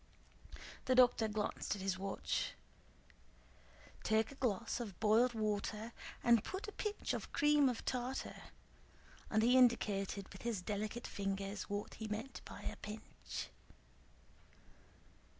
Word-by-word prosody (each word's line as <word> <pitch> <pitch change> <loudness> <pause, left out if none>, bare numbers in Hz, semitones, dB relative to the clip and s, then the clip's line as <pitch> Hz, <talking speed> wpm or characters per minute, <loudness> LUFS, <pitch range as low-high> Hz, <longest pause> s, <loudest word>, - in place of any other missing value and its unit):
The 255 - +3
doctor 245 -3 +6
glanced 210 0 -1
at 200 - -7
his 190 -1 0
watch. 195 0 -1 1.5
"Take 220 +2 +2
a - - -8
glass 235 -4 0
of 205 -7 -6
boiled 225 +3 +4
water 215 +1 -1 0.3
and 235 -3 +6
put 385 +3 -4
a - - -4
pinch 420 0 -2
of - - -4
cream 295 -2 +5
of 245 - -4
tartar," 255 +1 -2 0.9
and 220 0 +3
he 245 +2 +6
indicated 200 -5 +3
with 195 - -10
his 225 -6 -2
delicate 210 +4 -2
fingers 195 0 -3
what 205 0 -3
he 220 - -5
meant 220 +5 -4
by - - -9
a - - -4
pinch. 215 +1 -6
220 Hz, 130 wpm, -37 LUFS, 205-245 Hz, 1.5 s, doctor